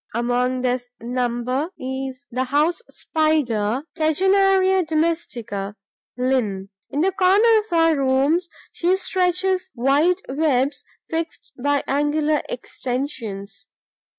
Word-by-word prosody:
Among 245 +2 0
this 250 -1 -1
number 245 +4 -1
is 265 +1 -5
the 255 +2 -1
House 300 - +1
Spider 270 -7 0
(Tegenaria 380 +3 +3
domestica, 310 - -2 0.4
LIN.). 230 -7 0 0.2
In 290 - -1
the 380 +3 +3
corners 420 +4 +4
of 355 - -7
our 330 -1 +4
rooms, 280 +6 +2 0.2
she 360 +2 +1
stretches 370 0 0
wide 285 +8 +2
webs 280 -1 0 0.2
fixed 325 0 -4
by 285 +2 0
angular 295 +2 +1
extensions. 250 - -5
285 Hz, 100 wpm, -22 LUFS, 250-340 Hz, 0.4 s, corners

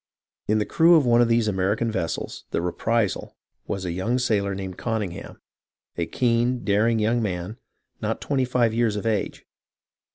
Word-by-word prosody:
In 110 - +2
the 105 - +1
crew 170 +1 +5
of 155 -4 +4
one 120 0 +5
of 120 - +4
these 115 -1 +2
American 105 +4 0
vessels, 95 -6 -4
the - - -1
Reprisal, 100 +4 -1 0.3
was 95 -1 -3
a 90 - -2
young 95 +8 -1
sailor 105 -6 0
named 95 -1 -6
Conyngham, 105 -7 -4 0.6
a 85 - -2
keen, 120 +3 +1
daring 110 +3 +2
young 115 +2 +1
man, 95 0 -4 0.4
not - - -2
twenty 135 -2 0
five 120 -3 +1
years 115 -2 +1
of 105 - -4
age. 110 -3 -2
110 Hz, 165 wpm, -24 LUFS, 95-120 Hz, 0.6 s, crew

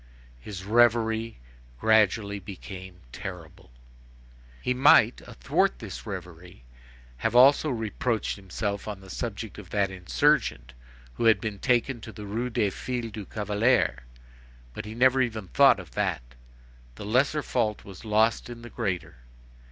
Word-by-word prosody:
His 95 - -8
reverie 115 0 +2 0.4
gradually 105 - +2
became 95 -1 -10
terrible. 85 -2 -9 0.9
He 125 - -1
might, 130 -3 +5
athwart - - 0
this - - -8
reverie, 90 -5 -9 0.5
have 120 - -1
also 140 +5 +6
reproached 115 -1 -2
himself 100 +1 -4
on 105 -2 -5
the 95 -1 -12
subject 110 -1 -5
of 95 -4 -12
that 100 -2 0
insurgent 65 -6 +1 0.4
who 115 - -2
had 110 -3 +5
been 105 -1 -5
taken 125 0 +1
to 110 - -9
the 105 -1 -9
Rue 115 +5 -3
des 105 -4 0
Filles 120 +1 -4
du 105 -2 -7
Calvaire; 105 - +1 0.7
but - - -7
he 110 +1 -7
never 130 +2 +4
even 110 -6 -2
thought 135 -6 +5
of 85 -7 -11
that. - - -2 0.6
The 100 - -8
lesser 135 +7 +1
fault 110 -4 -1
was 100 +1 -11
lost 110 +2 +1
in 120 -1 -9
the 120 - -10
greater. 95 - -3
105 Hz, 140 wpm, -27 LUFS, 95-120 Hz, 0.9 s, also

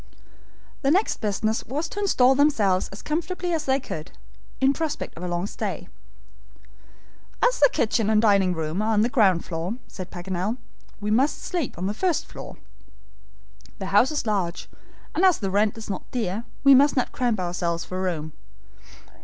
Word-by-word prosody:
The 275 - +2
next 380 +8 +2
business 215 +1 0
was 295 +6 -3
to 410 - -6
install 265 -11 +4
themselves 225 -10 +2
as 195 - -10
comfortably 350 +3 -2
as 315 -2 -1
they 265 0 +2
could, 160 - -7 0.5
in 270 +1 +4
prospect 320 0 -4
of 165 - -9
a 180 - -3
long 175 +1 -1
stay. - - -5 1.6
"As - - -1
the 285 - +7
kitchen 220 -1 +1
and 215 -1 +4
dining 200 -4 +3
room 160 +4 -2
are 220 +1 +1
on 210 - +3
the 235 - +1
ground 195 -9 +3
floor," 170 +5 -3
said 185 -2 -8
Paganel, 185 +5 -3 0.4
"we 210 0 -2
must 265 +7 +2
sleep 345 -8 -3
on 180 - -3
the 200 - -1
first 350 - 0
floor. - - -10 1.2
The 190 0 -5
house 210 +6 +6
is 305 -4 -2
large, 190 -5 -1 0.5
and 350 - 0
as 370 -4 +6
the 195 -3 -3
rent 205 +2 +2
is 220 - -8
not 195 -3 -5
dear, 225 -2 -2 0.2
we 275 -1 +8
must 280 +2 +5
not 250 - +1
cramp 240 -5 0
ourselves 175 -2 -2
for 185 0 -4
room. 155 -5 -3
215 Hz, 175 wpm, -24 LUFS, 185-275 Hz, 1.6 s, we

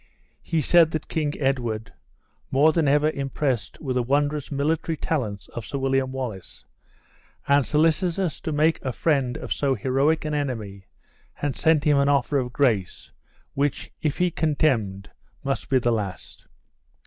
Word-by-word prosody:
He 165 -2 -1
said 165 +3 +5
that 155 -1 -4
King 150 -2 -1
Edward, 120 -6 -1 0.6
more 145 +4 +4
than 160 -3 +2
ever 150 +2 +3
impressed 135 -3 -2
with 135 -5 -3
the 125 - +2
wondrous 145 +3 0
military 155 +3 -1
talents 110 -13 -3
of 120 - -6
Sir 140 - -5
William 135 -1 0
Wallace, 125 -8 -6 0.8
and 140 0 +4
solicitous 165 +3 +1
to 160 - -3
make 155 +2 +2
a 130 - -1
friend 135 -6 0
of - - -3
so 140 -2 0
heroic 135 +8 +1
an 150 - -2
enemy, 110 -10 -4 0.5
had 145 -2 -3
sent 160 -2 +3
him 150 -2 +4
an 140 0 +3
offer 140 0 +2
of 125 -1 -3
grace, 115 -9 0 0.4
which, 140 0 -1
if 150 -3 -1
he 180 -1 +2
contemned, 125 -12 0 0.3
must 135 -1 -2
be 135 - +4
the 120 -1 +1
last. 100 -5 -5
140 Hz, 155 wpm, -24 LUFS, 125-155 Hz, 0.8 s, said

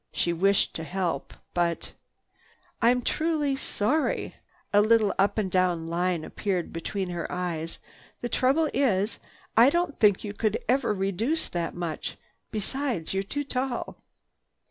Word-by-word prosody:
She 170 - 0
wished 195 +4 +3
to 160 - -5
help, 170 -3 -2 0.2
but— 170 -1 0 0.9
"I'm 245 +1 +4
truly 310 -2 +1
sorry!" 270 +4 0 0.4
A 205 - +7
little 215 -1 +4
up 200 +2 +3
and 200 -4 0
down 180 -3 +2
line 175 -1 0
appeared 185 -1 -2
between 185 +3 -3
her 175 -2 -4
eyes. 170 -2 -2 0.4
"The 240 - -1
trouble 275 +6 +3
is, 215 -6 +1 0.4
I 235 +4 +8
don't 345 -1 0
think 205 -3 +4
you 205 -2 -4
could 215 0 0
ever 255 0 +2
reduce 210 - 0
that 170 -1 -3
much. 170 -3 -4 0.3
Besides, 220 - -2
you're 195 - +1
too 285 +9 -3
tall." 260 -2 -3
200 Hz, 140 wpm, -27 LUFS, 175-250 Hz, 0.9 s, I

